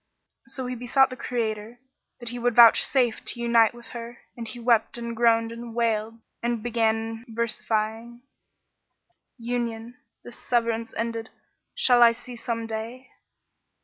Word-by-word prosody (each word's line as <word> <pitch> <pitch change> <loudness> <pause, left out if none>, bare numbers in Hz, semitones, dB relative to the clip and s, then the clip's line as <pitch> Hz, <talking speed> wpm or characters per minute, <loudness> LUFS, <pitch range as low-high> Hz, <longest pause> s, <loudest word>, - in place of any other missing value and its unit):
So 265 -1 -5
he 250 - -3
besought 255 +2 +2
the - - -5
Creator 225 -2 -3 0.4
that 240 -1 -6
he 245 +1 -6
would 240 -1 0
vouch 235 -2 +8
safe 250 -4 +1
to 240 - -2
unite 235 -2 +4
him - - -14
with 240 - -13
her 235 0 -8 0.2
and 235 -1 -7
he 240 +3 -8
wept 235 -1 +2
and 235 -1 -5
groaned 230 -1 +3
and 230 0 -8
wailed 225 -1 -1 0.2
and 235 -2 -2
began 225 -1 -1
versifying, 230 +1 -2 1.1
"Union, 235 -1 -4 0.3
this 240 - -10
severance 230 -1 -1
ended, 230 0 -3 0.5
shall 250 - +4
I 235 -1 +8
see 245 +1 -11
some 230 -1 -4
day? 225 +3 -6
235 Hz, 145 wpm, -25 LUFS, 225-240 Hz, 1.1 s, vouch